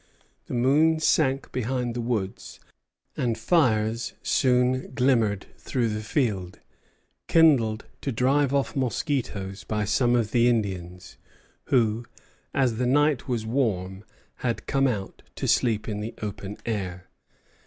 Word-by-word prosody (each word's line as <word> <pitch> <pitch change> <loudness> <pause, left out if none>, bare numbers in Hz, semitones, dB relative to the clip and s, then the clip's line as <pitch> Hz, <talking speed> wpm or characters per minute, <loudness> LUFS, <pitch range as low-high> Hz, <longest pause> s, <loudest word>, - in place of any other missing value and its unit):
The - - -4
moon 150 +6 +3
sank 140 -3 +1
behind 125 0 -2
the 120 - -3
woods, 110 -5 -3 0.6
and 120 -2 -1
fires 115 -4 +1
soon 125 0 +2
glimmered 115 -7 +2
through 120 -3 -1
the 105 0 -3
field, 105 - -1 0.7
kindled 130 -10 +4 0.2
to 140 - -2
drive 135 +4 +2
off 140 -1 0
mosquitoes 120 - -2
by 105 -1 -2
some 120 +3 +2
of 115 -4 0
the 120 0 +4
Indians 95 -6 -2 0.5
who, 115 -3 +2 0.5
as 130 -5 +1
the 125 +1 0
night 145 0 +2
was 120 -4 -2
warm, 100 -6 -1 0.3
had 120 -2 -2
come 135 0 +2
out 100 -6 -4
to - - -3
sleep 110 -4 +2
in 105 -2 -3
the 110 +2 -5
open 105 -1 -6
air. 95 -5 -3
120 Hz, 130 wpm, -26 LUFS, 105-130 Hz, 0.7 s, kindled